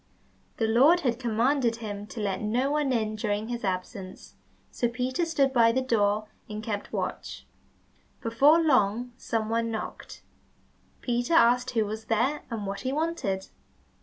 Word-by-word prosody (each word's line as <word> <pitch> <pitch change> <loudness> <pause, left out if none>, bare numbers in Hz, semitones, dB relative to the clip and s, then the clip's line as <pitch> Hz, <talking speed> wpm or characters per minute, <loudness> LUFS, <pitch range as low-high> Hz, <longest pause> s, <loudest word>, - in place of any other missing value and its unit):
The 225 - +1
Lord 275 +11 +5
had 245 -5 0
commanded 240 +1 +1
him 210 -3 -6
to 230 - -8
let 195 -3 -2
no 245 +6 0
one 295 -2 +1
in 215 -3 0
during 210 +1 -2
his 240 -1 -4
absence, 185 0 -5 0.4
so 240 - 0
Peter 255 +7 -1
stood 280 -5 +1
by 230 -2 +5
the 255 - +1
door 215 -3 +1 0.2
and 215 0 -6
kept 210 -2 -4
watch. - - -4 0.7
Before 275 +8 +4
long 245 -6 +2
some 225 -3 -2
one 230 +1 0
knocked. 220 -1 -6 0.8
Peter 245 +6 0
asked 250 -3 +4
who 220 - +3
was 220 +1 -6
there, 245 +7 +1
and 225 -4 -4
what 195 0 -4
he 260 - -2
wanted? 290 - -2
230 Hz, 155 wpm, -27 LUFS, 215-260 Hz, 0.8 s, Lord